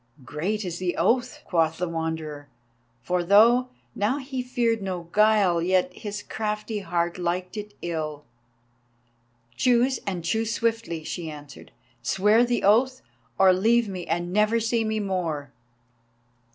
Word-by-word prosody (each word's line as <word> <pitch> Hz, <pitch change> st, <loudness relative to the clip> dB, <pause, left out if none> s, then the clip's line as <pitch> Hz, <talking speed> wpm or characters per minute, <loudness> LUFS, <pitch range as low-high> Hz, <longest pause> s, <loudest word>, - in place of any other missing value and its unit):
"Great 190 Hz, -, -2 dB
is 175 Hz, -1 st, -4 dB
the 180 Hz, -1 st, -2 dB
oath," 245 Hz, +8 st, +1 dB
quoth 160 Hz, -2 st, +1 dB
the 180 Hz, -, -2 dB
Wanderer; 160 Hz, -3 st, -4 dB, 0.5 s
for 180 Hz, +5 st, 0 dB
though 230 Hz, +7 st, +5 dB, 0.2 s
now 215 Hz, +7 st, 0 dB
he 265 Hz, -2 st, -4 dB
feared 235 Hz, -3 st, 0 dB
no 185 Hz, -3 st, -4 dB
guile, 210 Hz, -5 st, +4 dB
yet 180 Hz, +1 st, +1 dB
his 205 Hz, +1 st, -6 dB
crafty 210 Hz, 0 st, -3 dB
heart 175 Hz, -2 st, -2 dB
liked 180 Hz, +2 st, -2 dB
it 210 Hz, -1 st, -7 dB
ill. 155 Hz, -3 st, -4 dB, 1.3 s
"Choose, 250 Hz, -, +2 dB
and 180 Hz, -4 st, -3 dB
choose 220 Hz, +5 st, 0 dB
swiftly," 225 Hz, -8 st, -1 dB
she 165 Hz, 0 st, -5 dB
answered. 145 Hz, -1 st, -11 dB, 0.3 s
"Swear 210 Hz, -, +3 dB
the 245 Hz, 0 st, 0 dB
oath, 255 Hz, +6 st, +3 dB, 0.3 s
or 190 Hz, -1 st, +6 dB
leave 225 Hz, +5 st, +3 dB
me 185 Hz, -3 st, -6 dB
and 175 Hz, +2 st, -2 dB
never 215 Hz, +3 st, +3 dB
see 230 Hz, 0 st, 0 dB
me 220 Hz, 0 st, -1 dB
more!" 170 Hz, -8 st, -3 dB
195 Hz, 140 wpm, -25 LUFS, 170-225 Hz, 1.3 s, or